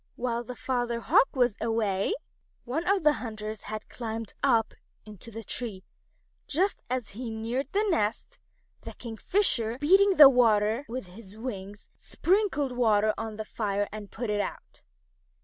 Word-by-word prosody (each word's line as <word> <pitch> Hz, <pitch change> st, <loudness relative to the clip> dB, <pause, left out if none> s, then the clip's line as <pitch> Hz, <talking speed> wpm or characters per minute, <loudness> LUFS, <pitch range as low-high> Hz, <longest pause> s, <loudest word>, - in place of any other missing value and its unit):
While 240 Hz, -1 st, -2 dB
the 250 Hz, +1 st, -8 dB
Father 245 Hz, -2 st, -1 dB
Hawk 235 Hz, -, +4 dB
was 245 Hz, -4 st, +2 dB
away, 220 Hz, -, 0 dB, 0.5 s
one 305 Hz, +8 st, -2 dB
of 395 Hz, -3 st, +2 dB
the 300 Hz, 0 st, +5 dB
hunters 215 Hz, -2 st, -5 dB
had 215 Hz, 0 st, -6 dB
climbed 225 Hz, -2 st, -5 dB
up 230 Hz, -5 st, +2 dB, 0.3 s
into 215 Hz, +1 st, -11 dB
the 225 Hz, 0 st, -7 dB
tree. 210 Hz, -5 st, -5 dB, 0.6 s
Just 370 Hz, +7 st, 0 dB
as 250 Hz, -4 st, -2 dB
he 235 Hz, +3 st, -6 dB
neared 230 Hz, +5 st, -3 dB
the 420 Hz, +2 st, +1 dB
nest, 225 Hz, -, -1 dB, 0.4 s
the -, -, -8 dB
Kingfisher, 235 Hz, -, 0 dB
beating 385 Hz, +7 st, +5 dB
the 295 Hz, -4 st, +11 dB
water 230 Hz, -1 st, +3 dB
with 250 Hz, -2 st, -4 dB
his 195 Hz, +2 st, -12 dB
wings, 205 Hz, -4 st, -7 dB
sprinkled 370 Hz, -8 st, 0 dB
water 215 Hz, -3 st, +3 dB
on 220 Hz, -1 st, -5 dB
the 220 Hz, 0 st, -5 dB
fire 205 Hz, -2 st, -1 dB
and 210 Hz, -1 st, -8 dB
put 235 Hz, -2 st, -4 dB
it 205 Hz, 0 st, +1 dB
out. -, -, -7 dB
230 Hz, 150 wpm, -28 LUFS, 215-260 Hz, 0.6 s, the